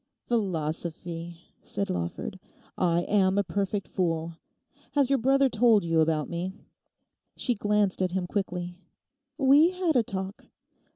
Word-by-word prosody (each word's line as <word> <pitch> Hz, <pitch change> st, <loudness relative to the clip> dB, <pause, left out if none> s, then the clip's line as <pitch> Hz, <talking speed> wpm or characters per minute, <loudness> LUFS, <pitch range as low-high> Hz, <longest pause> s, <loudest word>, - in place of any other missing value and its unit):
'"Philosophy!"' 170 Hz, -4 st, -3 dB, 0.2 s
said 200 Hz, 0 st, -3 dB
Lawford; 85 Hz, -1 st, -4 dB, 0.4 s
'I 170 Hz, -1 st, +2 dB
am 195 Hz, -1 st, +2 dB
a 200 Hz, -, +3 dB
perfect 200 Hz, +2 st, -2 dB
fool. 165 Hz, -2 st, -2 dB, 0.5 s
Has 280 Hz, -2 st, +2 dB
your 275 Hz, -, +3 dB
brother 270 Hz, +3 st, +4 dB
told 225 Hz, -5 st, +4 dB
you 165 Hz, -1 st, +2 dB
about 155 Hz, -1 st, +2 dB
me?' 175 Hz, +2 st, -4 dB, 0.8 s
She 250 Hz, -, +1 dB
glanced 205 Hz, -3 st, +1 dB
at 185 Hz, -, +2 dB
him 185 Hz, -1 st, -1 dB
quickly. 180 Hz, -2 st, -3 dB, 0.6 s
'We 285 Hz, +4 st, +6 dB
had 360 Hz, -4 st, 0 dB
a 245 Hz, -, +6 dB
talk. 195 Hz, -2 st, -6 dB
190 Hz, 130 wpm, -27 LUFS, 170-225 Hz, 0.8 s, We